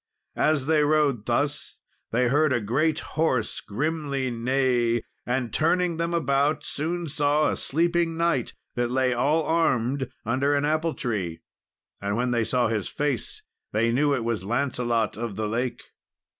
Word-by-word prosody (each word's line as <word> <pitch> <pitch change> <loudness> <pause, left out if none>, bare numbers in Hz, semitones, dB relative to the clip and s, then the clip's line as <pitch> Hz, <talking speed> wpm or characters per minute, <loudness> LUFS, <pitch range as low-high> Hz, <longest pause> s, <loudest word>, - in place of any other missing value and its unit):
As 150 -3 +2
they 155 0 +3
rode 145 -7 +2
thus, 145 +5 -1 0.3
they 125 +2 +2
heard 150 +3 +3
a 125 - +2
great 145 +9 +1
horse 130 -8 -1
grimly 140 +1 -2
neigh, 120 -1 +1 0.2
and, 125 -1 -1
turning 170 +1 +2
them 170 +1 -1
about, 145 -2 +1
soon 170 +4 -2
saw 150 0 +2
a - - -1
sleeping 170 +2 0
knight 170 -7 0 0.2
that 120 -1 -1
lay 130 0 +2
all 145 +7 +2
armed 135 -5 +1 0.2
under 135 +5 +1
an 140 0 +1
apple 155 +2 0
tree; 95 - -3 0.6
and 100 +1 -1
when 125 +1 0
they 120 -2 +2
saw 125 +1 +1
his 110 -3 -2
face, 145 -6 -3 0.3
they 115 +2 +2
knew 140 +3 +2
it 120 - -2
was 115 -4 -1
Lancelot 120 -1 0
of 115 -3 -4
the 110 +1 -2
Lake. 120 +3 -2
135 Hz, 155 wpm, -25 LUFS, 120-155 Hz, 0.6 s, they